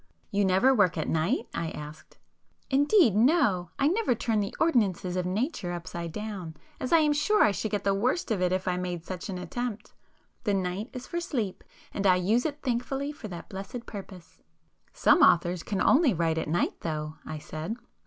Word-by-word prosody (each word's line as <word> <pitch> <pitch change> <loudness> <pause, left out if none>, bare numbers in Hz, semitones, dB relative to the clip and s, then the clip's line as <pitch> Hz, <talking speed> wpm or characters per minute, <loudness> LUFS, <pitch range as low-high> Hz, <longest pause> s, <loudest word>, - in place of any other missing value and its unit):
"You 200 0 +2
never 190 +8 +4
work 185 -7 +3
at 155 - -2
night?" 170 - 0
I 165 - -2
asked. 150 0 -10 0.5
"Indeed 285 - +5
no! 220 - +3
I 275 - +3
never 370 - +2
turn 225 -1 0
the 200 -1 -3
ordinances 200 - +1
of 180 -1 -1
Nature 195 - -2
upside 170 0 -5
down, 190 -5 -6 0.2
as 255 -4 -4
I 335 - +7
am 305 -2 +3
sure 415 +9 +3
I 210 - +4
should 200 +3 -2
get 205 -2 -2
the 200 - +2
worst 240 - 0
of 200 -4 0
it 180 0 +2
if 185 0 -1
I 180 -1 +1
made 180 -2 -4
such 185 +1 -6
an 185 - -3
attempt. 230 +2 -5 0.5
The 205 -3 +1
night 190 +5 -2
is 255 -1 -7
for 345 - -3
sleep—and 220 - -4
I 185 - +6
use 215 - +2
it 295 -1 -8
thankfully 270 +3 -1
for 280 -7 -9
that 175 -4 -8
blessed 200 +5 -7
purpose." 190 -5 -10 0.5
"Some - - +4
authors 175 - +4
can 195 +2 -3
only 270 - +4
write 165 -1 +1
at - - -3
night 170 +3 0
though," 155 -1 -4
I 155 - -6
said. 155 +7 -5
200 Hz, 195 wpm, -28 LUFS, 180-255 Hz, 0.5 s, I